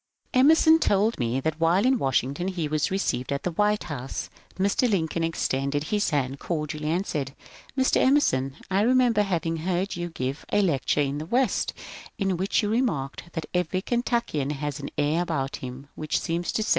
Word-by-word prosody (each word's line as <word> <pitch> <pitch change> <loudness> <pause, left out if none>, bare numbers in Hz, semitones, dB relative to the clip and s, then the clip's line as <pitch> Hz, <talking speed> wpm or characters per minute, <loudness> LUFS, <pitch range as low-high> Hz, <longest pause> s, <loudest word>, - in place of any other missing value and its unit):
Emerson 315 +4 +6
told 210 -3 +2
me 120 +1 0
that 160 +3 -2
while 170 +6 +3
in 260 -1 +3
Washington 135 +5 0
he 175 -5 -2
was 155 +3 0
received 185 -10 -1
at 140 - -2
the 180 - -1
White 210 +4 +1
House». 135 -6 -5 0.2
Mr. 200 +6 +2
Lincoln 165 -4 0
extended 145 -3 -1
his 205 +6 0
hand 140 -3 -1
cor 155 -3 -2
dially 150 +1 -6
and 170 +5 0
said: 140 -5 -3 0.4
"Mr. 260 0 +3
EmersOn; 135 - +3 0.2
f" 195 +2 +3
remember 245 -2 +4
having 170 -4 -1
heard 180 +4 -1
you 175 0 -4
give 135 -3 -4
a 205 - +3
lecture 150 -4 +1
in 140 0 -1
the 155 - -6
West, 245 +1 +1 0.4
in 195 -2 0
which 190 +5 +1
you 205 - 0
remarked 175 - -1
that 165 - -3
every 180 +1 0
Kentuokian 235 - 0
has 145 0 -4
an 140 - -5
air 150 +3 +2
about 150 -6 -2
him 130 +2 -8
which 155 -1 -1
seems 170 +1 -2
to 220 - 0
say. - - -3
165 Hz, 185 wpm, -26 LUFS, 145-205 Hz, 0.4 s, Emerson